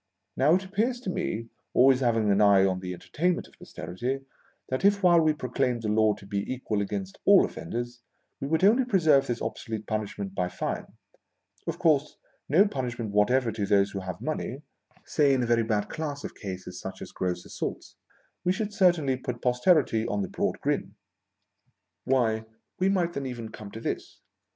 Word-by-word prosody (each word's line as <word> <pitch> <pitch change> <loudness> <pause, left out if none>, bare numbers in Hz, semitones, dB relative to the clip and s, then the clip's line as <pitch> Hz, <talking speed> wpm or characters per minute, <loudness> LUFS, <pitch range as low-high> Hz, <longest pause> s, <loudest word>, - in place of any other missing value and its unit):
Now, 145 +6 +4
it 190 +1 -1
appears 225 +6 0
to 190 - -3
me, 115 -9 -3 0.3
always 130 +1 +6
having 115 -5 +2
an 100 +1 +3
eye 100 -2 +6
on 95 -1 0
the 90 0 -5
entertainment 170 - -1
of - - -22
Posterity, 125 +9 -4 0.5
that 130 +5 -2
if 200 0 +4
while 175 -2 +6
we 155 -1 +4
proclaimed 125 -4 -1
the 110 - -1
laws 105 -1 +3
to - - -12
be 100 0 -2
equal 115 -5 -2
against 100 -1 -4
all - - +7
offenders, 120 +7 -5 0.4
we 135 - -3
would 160 +4 +1
only 225 +7 +6
preserve 160 - +4
this 120 -1 -2
obsolete 110 0 -4
punishment 105 -2 -3
by 90 -2 -1
fine 90 - -3 0.4
— 100 +2 -41
of 165 0 -2
course 150 -4 +2 0.3
no 185 +9 +5
punishment 120 - -3
whatever 115 +4 +3
to 105 -3 -2
those 100 -1 +3
who 100 - -4
have 95 -1 -6
money 150 -2 -3 0.2
— - - -32
say 140 -3 +5
in 125 - +1
a - - +1
very 115 0 +3
bad 105 -2 0
class 145 -2 -4
of - - -6
cases 90 -2 -7
such 95 - -7
as - - -10
gross 90 -1 -3
assaults, - - -5 0.5
we 180 - +2
should 210 +2 -2
certainly 175 -10 +3
put 125 -2 -5
Posterity 125 -2 +2
on 105 -3 -1
the 95 - -5
broad - - -1
grin. - - -1 1.1
Why, 115 -4 +1 0.3
we 185 +1 +3
might 175 -3 +1
then 140 -1 -3
even 120 -3 -6
come 105 -1 -9
to 110 - -8
this. - - -5
120 Hz, 190 wpm, -27 LUFS, 105-155 Hz, 1.1 s, all